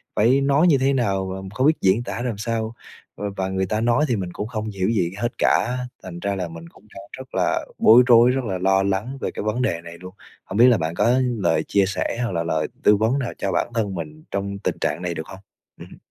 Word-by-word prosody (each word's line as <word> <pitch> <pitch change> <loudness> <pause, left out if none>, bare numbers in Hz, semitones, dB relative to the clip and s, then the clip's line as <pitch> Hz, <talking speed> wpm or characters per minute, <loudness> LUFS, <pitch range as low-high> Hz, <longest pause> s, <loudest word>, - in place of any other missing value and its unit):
phải 125 +6 +3
nói 140 +5 +3
như 150 - +5
thế 135 +1 +2
nào 100 -7 0
và 95 +1 -5
không 130 +5 +3
biết 160 - +2
diễn 100 +5 +3
tả 120 - -5
làm 120 -4 -3
sao, 115 +1 -3 0.4
v - - -11 0.2
và 95 0 -1
người 95 0 -1
ta 110 +3 -2
nói 120 +5 +2
thì 120 - +1
mình 95 -3 -3
cũng 105 - -4
không 110 -2 -4
hiểu 95 -1 -1
gì 90 -7 0
hết 120 +2 -1
cả. 125 +4 +2 0.3
Thành 90 -2 -8
ra 100 +2 -2
là 90 -2 -3
mình 85 0 -10
cũng 105 - -22
đang 100 - -9
rất 130 0 -11
là - - 0
bối 120 +3 +7
rối, 120 +1 +6
rất 130 0 -1
là 95 -3 -2
lo 95 +1 +2
lắng 100 +8 -2
về - - -2
cái - - -5
vấn 110 +4 -1
đề 85 -9 -1
này 85 0 -10
luôn, 90 0 -10 0.3
hổng 95 - -5
biết 120 +2 +7
là 120 - +5
bạn 80 0 -3
có 120 +5 +3 0.2
lời 90 - +1
chia 100 -1 +3
sẻ 100 +3 -2
hoặc 115 - -2
là 85 -1 -1
lời 80 -1 -1 0.2
tư 105 - +6
vấn 115 +6 +1
nào 125 -3 -3
cho 95 - -2
bản - - -1
thân 105 -4 -1
mình 80 -2 -7
trong 100 0 -3
tình - - -2
trạng 85 - -1
này, 90 -1 -2
được 80 -1 -6
hông? 95 - -10 0.4
Ừm. - - -12
105 Hz, 260 wpm, -22 LUFS, 95-120 Hz, 0.4 s, bối